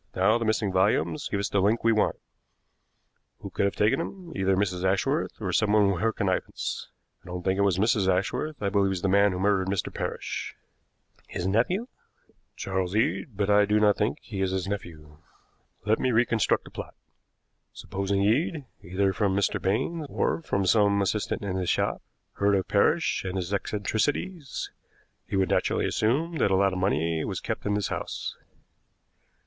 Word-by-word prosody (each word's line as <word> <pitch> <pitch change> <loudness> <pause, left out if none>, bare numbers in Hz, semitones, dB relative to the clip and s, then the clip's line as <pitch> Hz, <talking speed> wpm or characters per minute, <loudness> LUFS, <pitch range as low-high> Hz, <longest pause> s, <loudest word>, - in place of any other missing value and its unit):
Now 105 +5 +3
the 115 - -2
missing 110 -2 +1
volumes 100 +10 +1
give 100 - -1
us 100 - -1
the 100 - +1
link 105 +4 +2
we 115 - +4
want. 110 -1 +2 1.3
Who - - -7
could - - 0
have 100 - 0
taken 105 +7 +2
them? 175 0 -6
Either 95 0 +2
Mrs. 95 -2 -1
Ashworth, 95 +1 0
or - - -3
someone 105 -2 +4
with 90 -3 -2
her 115 - +2
connivance. 95 -4 -2 0.3
I - - -18
don't 90 0 -5
think 95 +1 0
it - - +4
was 100 -3 +2
Mrs. 105 -1 +2
Ashworth. 95 +11 0
I 100 - +2
believe 100 0 +2
it - - 0
was 95 -2 -2
the - - +2
man 100 +1 +4
who 90 - -3
murdered 95 0 +1
Mr. 100 0 -2
Parrish." - - -4 0.7
"His 90 - -4
nephew?" 120 - +1 0.7
"Charles 95 -1 -2
Eade; 120 -1 0
but 100 0 +1
I 105 0 +5
do 105 +1 +2
not 105 -1 +4
think 105 +2 0
he 100 -4 -5
is 95 - +1
his 95 0 -2
nephew. 80 -7 -6 0.7
Let 110 +1 +2
me 130 - +1
reconstruct 115 -1 +2
the - - -13
plot. - - -8 0.8
Supposing 100 +1 -2
Eade, 140 - +1 0.2
either 95 +2 0
from 95 -1 +1
Mr. 100 - 0
Baines 135 - -1
or - - 0
from 100 -11 -1
some 100 0 +4
assistant 105 +2 -1
in 95 -2 -2
his 90 -2 -1
shop, - - 0 0.4
heard 100 0 +3
of 95 - 0
Parrish 155 +11 +2
and 95 0 -4
his 90 +1 -3
eccentricities, 135 - -2 0.6
he - - -3
would 95 -1 +2
naturally - - +1
assume 155 +10 0
that - - +3
a 95 - +3
lot 95 0 +3
of 95 - -2
money 85 -4 0
was - - -3
kept - - -4
in 105 - +1
this 105 -2 -1
house. - - -4
100 Hz, 185 wpm, -27 LUFS, 95-110 Hz, 1.3 s, I